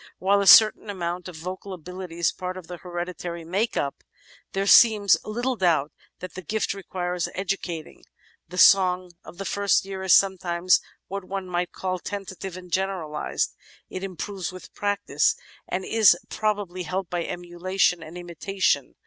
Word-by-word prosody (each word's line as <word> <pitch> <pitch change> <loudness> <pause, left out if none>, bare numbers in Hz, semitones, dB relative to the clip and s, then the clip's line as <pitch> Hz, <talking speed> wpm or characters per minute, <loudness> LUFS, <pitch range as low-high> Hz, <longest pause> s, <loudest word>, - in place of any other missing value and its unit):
While 200 +2 +2
a 200 - 0
certain 215 +2 +8
amount 175 -2 -4
of 180 - -9
vocal 185 +4 -6
ability 180 0 -8
is 170 -1 +2
part 185 0 -5
of 185 - -9
the 175 +1 -8
hereditary 175 -1 -6
make 200 +7 -1
up, 140 - -2 0.5
there 195 +1 0
seems 210 -1 +7
little 240 +4 -2
doubt 165 -7 +2 0.3
that 185 -1 -7
the 185 - -7
gift 210 +5 -1
requires 180 -2 -3
educating. 180 -4 -4 0.4
The 180 - -9
song 185 -2 +5
of 175 - -12
the 195 - -5
first 200 -1 +2
year 195 -1 -6
is 190 -1 +6
sometimes 185 -2 +3 0.3
what 195 +1 -5
one 190 0 -5
might 175 -1 -2
call 185 -1 -3
tentative 190 -1 -6
and 180 -1 -12
generalised. 185 -6 -1 0.4
It 185 - -5
improves 190 -1 -4
with 185 -1 -12
practice 205 - +1 0.3
and 185 +1 -3
is 220 -6 +5
probably 205 -4 -2
helped 185 +2 -4
by 175 -1 -1
emulation 175 0 0
and 165 +2 -9
imitation. 180 +3 -1
185 Hz, 155 wpm, -25 LUFS, 175-195 Hz, 0.5 s, certain